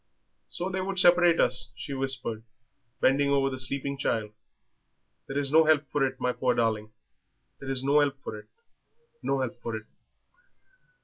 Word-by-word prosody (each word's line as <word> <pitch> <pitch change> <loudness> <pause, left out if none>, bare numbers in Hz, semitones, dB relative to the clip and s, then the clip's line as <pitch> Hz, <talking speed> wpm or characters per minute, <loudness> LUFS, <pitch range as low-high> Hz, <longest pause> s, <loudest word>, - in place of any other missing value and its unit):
"So 175 - -4
they 190 0 -3
would 195 0 -4
separate 175 -2 +5
us," 125 -1 +3
she 120 +4 -7
whispered, 130 -4 0 0.6
bending 140 +2 +3
over 135 -1 +2
the 130 - -5
sleeping 140 +1 -1
child. 110 -5 -1 1.0
"There 135 - -4
is 140 -1 -1
no 160 +1 +6
help 155 -2 +3
for 145 -2 +1
it, 130 0 -8
my 125 - 0
poor 125 -1 0
darling. 110 -2 -1 0.7
There's 135 -1 -3
no 140 +2 +3
help 140 -2 0
for - - -6
it, - - -16 0.7
no 135 -1 -1
help 130 -3 -5
for 115 - -4
it." 110 0 -7
135 Hz, 165 wpm, -27 LUFS, 125-145 Hz, 1.0 s, no